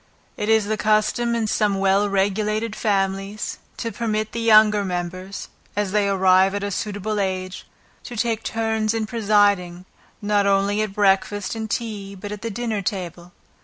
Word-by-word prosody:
It 210 - -3
is 220 -2 +4
the 215 +1 -1
custom 215 +3 +1
in 230 -1 0
some 210 -2 +1
well 195 +1 +2
regulated 210 +3 0
families, 195 0 -1 0.2
to 230 - -3
permit 215 -2 -2
the 235 - -4
younger 215 -2 +5
members, 185 +1 -5 0.3
(as 205 -2 -1
they 205 -1 +2
arrive 190 0 +4
at 205 - -3
a 200 - -2
suitable 210 +1 -3
age,) 185 -1 -3 0.4
to 240 - -7
take 225 0 0
turns 220 -1 -1
in 225 -1 -1
presiding, 205 -5 +1 0.3
not 205 -1 +1
only 200 +1 +2
at 215 -2 -2
breakfast 195 0 +1
and 220 -1 -5
tea, 200 -2 -4
but 205 +2 -8
at 210 0 -6
the 230 - -3
dinner 225 -1 -2
table. 180 -2 -5
205 Hz, 165 wpm, -22 LUFS, 195-215 Hz, 0.4 s, younger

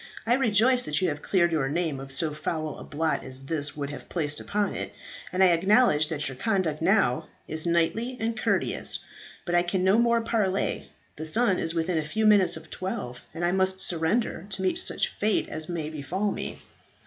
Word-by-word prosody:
I 235 - +3
rejoice 250 0 +3
that 150 +1 +1
you 185 - +1
have 145 -1 -4
cleared 170 -3 +2
your 150 -5 0
name 160 -2 -1
of 135 0 -8
so 155 +2 0
foul 155 0 -3
a - - -8
blot 155 +2 -1
as 130 +1 -3
this 145 -1 -1
would 140 -1 -3
have 145 - -9
placed 150 -4 -2
upon 205 -1 -1
it, - - -5 0.4
and 185 +1 +3
I 185 - +7
acknowledge 175 -2 +4
that 150 -1 -2
your 135 -2 -6
conduct 185 - 0
now 160 - +2 0.2
is 155 +2 -1
knightly 220 +9 +1
and 225 +1 -1
courteous. 215 - 0 0.5
But 175 - -2
I 175 - +5
can 180 +1 -1
no 190 +4 +4
more 235 0 +3
parley. 205 -4 -1 0.3
The 155 +1 -5
sun 215 +2 +3
is 165 +1 -2
within 165 0 0
a - - -2
few 220 +9 -1
minutes 205 -5 +5
of 160 0 -13
twelve, 125 -10 -4
and 170 +1 -3
I 175 - +2
must 190 0 +1
surrender, 175 +2 -1
to 190 -1 -3
meet 185 - +1
such - - +1
fate 215 +1 0
as 155 +1 -4
may 165 -3 -3
befall 180 +7 -2
me." - - -5
175 Hz, 205 wpm, -27 LUFS, 155-200 Hz, 0.5 s, I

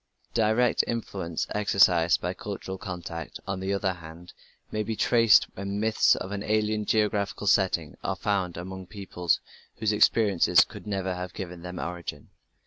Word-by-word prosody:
The 115 - +2
direct 110 +2 +3
influence 95 -8 -3
exercised 90 -5 +4
by 90 +1 -2
cultural 95 -1 -6
contact, 85 -4 -6
on 95 -1 -3
the 95 +1 -2
other 100 -1 0
hand, 85 +1 -12 0.4
may 110 - -1
be 110 +1 -3
traced 115 0 +5
when 100 +1 -4
myths 110 +1 +3
with 95 - -6
an 100 -1 -3
alien 105 0 0
geographical 105 -2 0
setting 95 -6 +2
are - - -1
found 95 -4 -1
among 95 +1 -7
peoples 90 -4 -1 0.4
whose 110 -1 +1
experiences 105 -3 +4
could - - -11
never 95 -2 -1
have 90 0 -6
given 90 -3 -6
them 90 +1 -7
origin. 85 -1 -6
95 Hz, 155 wpm, -27 LUFS, 90-105 Hz, 0.4 s, traced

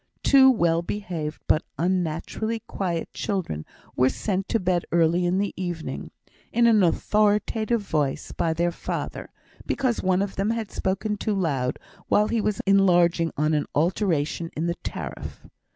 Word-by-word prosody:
Two 265 -1 +7
well 170 -9 +3
behaved 170 -5 -4
but 155 - +3 0.2
unnaturally 185 +6 -1
quiet 180 -6 -3
children 170 - -3 0.3
were 130 +1 +4
sent 195 +3 -2
to 230 - +2
bed 180 -2 +1
early 170 +1 +3
in 180 +2 +1
the 200 0 -1
evening, 175 -3 -4 0.4
in 235 0 +3
an 225 -3 +5
authoritative 210 +5 +2
voice, 150 -8 -1
by 165 - 0
their 170 +2 +1
father, - - -5 0.4
because 255 -4 0
one 185 +1 +2
of 200 - -6
them 195 +2 +1
had 225 -2 -2
spoken 200 +3 -1
too 210 0 -1
loud 140 -9 0 0.3
while 210 +1 +3
he 230 - +1
was 210 -1 -1
enlarging 175 -4 +4
on 155 +2 +2
an 150 -1 0
alteration 165 -1 0
in 160 - -1
the 170 0 -1
tariff. - - -6
185 Hz, 150 wpm, -25 LUFS, 165-210 Hz, 0.4 s, Two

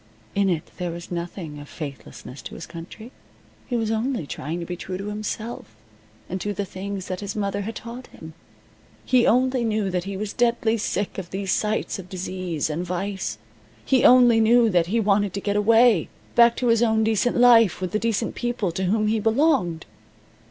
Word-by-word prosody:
In 200 -1 +2
it 165 -4 -2
there 180 -1 -3
was 170 +1 -8
nothing 170 -3 -5
of 145 - -11
faithlessness 140 -3 -8
to - - -9
his - - -7
country. 185 +8 -10 0.6
He 245 - -2
was 225 -2 0
only 230 - -1
trying 155 +4 -5
to 170 - -5
be 175 - -5
true 185 +1 -6
to 200 +2 -5
himself, 215 - -5 0.5
and 185 +1 -4
to 205 -1 -3
the 200 - -2
things 195 0 -6
that 185 -1 -4
his 200 -1 -5
mother 200 -1 -1
had 220 +3 -5
taught 240 +2 -8
him. 160 0 -12 0.7
He 250 -2 +4
only 255 +1 +3
knew 215 -3 0
that 180 0 -2
he 195 -1 -4
was 205 0 -4
deadly 235 -1 +1
sick 200 -1 -2
of 180 -2 -7
these 195 0 -3
sights 215 -1 -1
of 185 -1 -10
disease, 185 -4 -3
and 160 +3 -3
vice. 180 - -3 0.5
He 260 -2 +3
only 245 -2 +7
knew 230 0 +5
that 175 -2 +2
he 225 +6 +1
wanted 205 -2 +1
to - - -1
get 205 0 -2
away 225 -2 +4 0.2
back 235 0 +6
to 245 - 0
his 230 0 +4
own 220 -2 +3
decent 220 +2 +1
life 235 -4 +6
with 185 -1 -3
the 215 - 0
decent 225 0 -1
people 240 -6 -2
to 185 +3 -2
whom 215 +4 +1
he 220 +1 +1
belonged. 225 - +1
205 Hz, 195 wpm, -24 LUFS, 180-230 Hz, 0.7 s, only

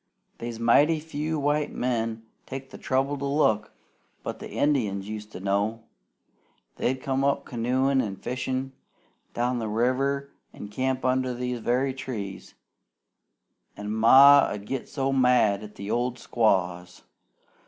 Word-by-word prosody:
"They's 115 -1 -5
mighty 145 +7 +4
few 155 0 -3
white 145 +1 0
men 115 -2 -2 0.2
takes 135 0 -7
the - - -10
trouble 135 +2 0
to 140 - -3
look, 110 -7 +1 0.5
but - - -5
the - - -8
Indians 105 -10 0
used 105 0 -7
to - - -7
know. 100 +4 -1 0.9
They'd 130 +1 -1
come 135 0 0 0.2
canoein' 130 +3 +1
an' 105 -5 -4
fishin' 130 +3 -3 0.6
down 120 +1 0
the 110 - -3
river 135 +5 0 0.2
an' 105 - -9
camp 130 +4 -2
under 130 -1 +1
these 125 0 -3
very 130 +4 0
trees, 110 -7 -7 1.2
an' 105 0 -5
Ma 135 +6 +8
'ud 100 -1 -6
git 135 +4 -4
so 135 -1 -1
mad 125 -6 +3
at 105 -1 -10
the 100 +2 -6
old 120 +1 0
squaws. 90 -7 0
125 Hz, 135 wpm, -26 LUFS, 110-135 Hz, 1.2 s, Ma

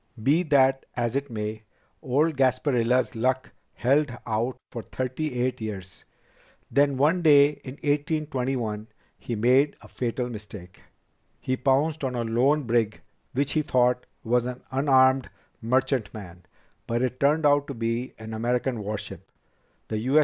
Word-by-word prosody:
"Be 145 +7 +4
that 135 -5 +3
as 120 0 -1
it 140 0 -1
may, 110 -1 -4 0.4
old 145 +5 +1
Gasparilla's 130 -2 +2
luck 130 +3 -1 0.2
held 140 +3 +2
out 115 +3 -1
for 115 - -5
thirty 130 +3 -3
eight 125 -1 -1
years. 95 -4 -7 0.7
Then, 140 -1 +3
one 155 +7 +3
day 145 -3 +7
in 130 - -7
1821, 135 -7 -2 0.3
he 120 - -4
made 130 +6 +3
a - - -13
fatal 125 0 -3
mistake. 105 -5 -10 0.6
He 130 - -1
pounced 140 +4 +1
on 130 -2 -1
a 120 - -1
lone 130 +7 +2
brig 115 -3 0 0.3
which 140 +2 0
he 155 - +2
thought 125 -3 +1 0.2
was 120 +1 +1
an 125 0 -6
unarmed 130 -1 +4 0.3
merchantman, 110 -8 -2 0.4
but 120 +2 0
it 130 0 -2
turned 150 +3 +3
out 145 0 +4
to 140 - -5
be 115 +2 -2
an 110 0 -8
American 120 +2 -1
warship, 100 -3 -6 0.6
the 110 - -2
U. 130 +7 +3
130 Hz, 140 wpm, -26 LUFS, 115-140 Hz, 0.7 s, day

